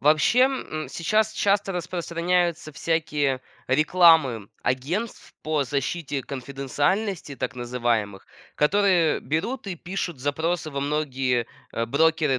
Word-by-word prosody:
Вообще, 155 Hz, -, +4 dB
м, 255 Hz, -12 st, 0 dB
сейчас 215 Hz, +6 st, +1 dB
часто 200 Hz, -1 st, +1 dB
распространяются 175 Hz, -1 st, -1 dB
всякие 150 Hz, -4 st, 0 dB, 0.3 s
рекламы 155 Hz, -, +4 dB
агентств 165 Hz, -, -2 dB
по 155 Hz, -2 st, 0 dB
защите 140 Hz, +1 st, -2 dB
конфиденциальности, 145 Hz, -, -2 dB
так -, -, -4 dB
называемых, 120 Hz, -5 st, -1 dB, 0.3 s
которые 180 Hz, 0 st, +3 dB
берут 200 Hz, -, -2 dB
и 190 Hz, -, -3 dB
пишут 175 Hz, -3 st, -4 dB
запросы 160 Hz, +4 st, -1 dB
во 140 Hz, -1 st, -3 dB
многие, 135 Hz, -5 st, 0 dB, 0.3 s
э, 115 Hz, 0 st, -1 dB
брокеры 155 Hz, 0 st, +2 dB
155 Hz, 105 wpm, -25 LUFS, 135-175 Hz, 0.3 s, Вообще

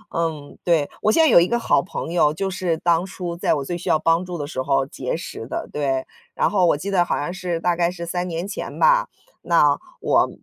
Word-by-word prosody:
嗯， 160 Hz, -3 st, -3 dB
对， 165 Hz, -5 st, +2 dB
我 215 Hz, -, +3 dB
现 320 Hz, +8 st, +4 dB
在 -, -, +5 dB
有 -, -, +8 dB
一 175 Hz, -, +2 dB
个 235 Hz, -, +1 dB
好 235 Hz, -, +2 dB
朋 175 Hz, -2 st, -6 dB
友， 165 Hz, -4 st, +3 dB
就 195 Hz, +5 st, -2 dB
是 180 Hz, -3 st, -1 dB
当 170 Hz, +1 st, +2 dB
初 180 Hz, -3 st, -5 dB
在 170 Hz, -, +1 dB
我 140 Hz, -2 st, -3 dB
最 175 Hz, -, -3 dB
需 -, -, -5 dB
要 -, -, +4 dB
帮 165 Hz, +3 st, +2 dB
助 180 Hz, -1 st, -5 dB
的 145 Hz, -, -4 dB
时 145 Hz, -3 st, -4 dB
候 135 Hz, 0 st, +1 dB
结 140 Hz, -, -4 dB
识 115 Hz, -8 st, -7 dB
的， -, -, -4 dB
对， 135 Hz, -3 st, -1 dB, 0.3 s
然 -, -, +2 dB
后 185 Hz, -4 st, +3 dB
我 145 Hz, -, +3 dB
记 195 Hz, +7 st, -5 dB
得 180 Hz, -3 st, +4 dB
好 170 Hz, -, -1 dB
像 145 Hz, +5 st, -3 dB
是 180 Hz, -3 st, -3 dB
大 175 Hz, 0 st, +1 dB
概 170 Hz, 0 st, +1 dB
是 175 Hz, -1 st, -6 dB
3 175 Hz, +1 st, -2 dB
年 170 Hz, +1 st, -4 dB
前 200 Hz, -, -6 dB
吧， -, -, +4 dB, 0.3 s
那 150 Hz, -4 st, +4 dB, 0.3 s
我 -, -, +3 dB
170 Hz, 260 characters per minute, -22 LUFS, 150-180 Hz, 0.3 s, 有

